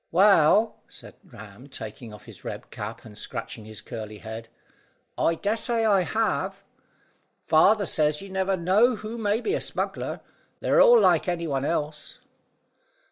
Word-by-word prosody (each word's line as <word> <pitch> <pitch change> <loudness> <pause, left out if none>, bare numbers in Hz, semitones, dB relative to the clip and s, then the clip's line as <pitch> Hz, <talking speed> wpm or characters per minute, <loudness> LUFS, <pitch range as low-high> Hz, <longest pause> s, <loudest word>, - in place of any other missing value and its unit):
"Well," 200 +3 +4
said - - -12
Ram, 110 +5 -13
taking 115 -2 -8
off 105 -2 -13
his - - -12
red - - -7
cap, 105 +3 -7
and 105 -2 -12
scratching 110 +1 -6
his 110 -1 -9
curly 110 -3 -8
head, 110 +1 -8 0.7
"I 165 - +1
dessay 225 +5 0
I 200 -3 +4
have. 195 0 -1 0.7
Father 200 +6 +3
says 150 -2 +1
you 195 - -9
never 190 0 0
know 205 +8 +3
who 220 +2 -7
may 210 +1 0
be 405 - -1
a - - -1
smuggler: - - -3 0.4
they're - - +3
all 485 -1 +8
like 220 - +3
any 175 -1 -1
one 140 -3 -1
else." 150 -2 -3
175 Hz, 150 wpm, -25 LUFS, -, 0.7 s, all